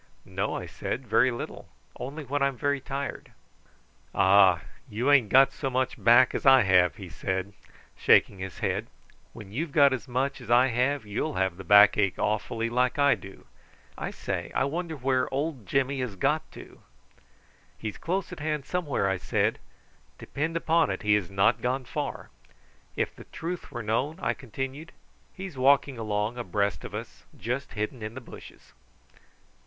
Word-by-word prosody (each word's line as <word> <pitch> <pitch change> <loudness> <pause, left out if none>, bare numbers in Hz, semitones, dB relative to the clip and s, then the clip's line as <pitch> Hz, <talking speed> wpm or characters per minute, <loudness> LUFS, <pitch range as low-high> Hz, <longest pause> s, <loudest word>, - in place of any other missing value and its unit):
"No," - - -2
I - - -4
said; 130 - -5
"very 115 +3 +3
little. 120 - -7 0.3
Only 145 +4 -6
when 145 +2 -2
I'm 140 -2 +1
very 145 +2 0
tired." 140 +1 -5 0.8
"Ah! 95 -3 +5 0.3
you 120 +7 0
ain't 130 -7 +5
got 135 +4 +6
so 135 - -3
much 130 0 -2
back 120 +2 +6
as - - -3
I 135 -3 +7
have," 90 -5 +4
he - - -9
said, 95 +1 -3 0.4
shaking 100 - +4
his 95 0 -6
head. - - -2 0.5
"When 105 -4 -11
you've 150 +8 -3
got 140 -2 +5
as 130 +1 -5
much 130 +2 -2
as 120 - -11
I 125 +2 +5
have 125 +2 0
you'll 110 +9 -3
have 95 -2 0
the 95 - -9
back 100 +3 +7
ache 100 -3 +1
awfully, 115 +2 -1
like 125 +3 +1
I 140 0 +5
do. 95 0 -10 0.5
I - - -4
say, - - -4
I - - +2
wonder 160 +3 -3
where 130 -1 0
old 135 - -3
Jimmy 135 0 0
has 125 -6 -3
got 145 +9 0
to." - - -13 1.0
"He's 110 -2 -6
close 185 +2 -2
at 180 - -8
hand 150 -2 -2
somewhere," 150 - -1
I 95 -1 0
said. - - 0 0.6
"Depend 160 +4 -3
upon 165 0 +2
it - - -4
he 105 0 +3
has 105 -4 +1
not 105 +4 +2
gone 130 +1 -1
far. 120 - -5 0.6
If - - -2
the - - -12
truth 175 +2 -6
were 120 -2 -5
known," 125 +9 -1
I - - 0
continued, 135 +5 -7 0.4
"he's 185 -8 -8
walking 140 -1 +3
along 110 +2 -2
abreast 100 - -1
of - - -7
us, - - -8
just 125 +7 -4
hidden 110 +3 -4
in 110 +2 -6
the - - -5
bushes." - - -14
125 Hz, 170 wpm, -27 LUFS, 105-140 Hz, 1.0 s, I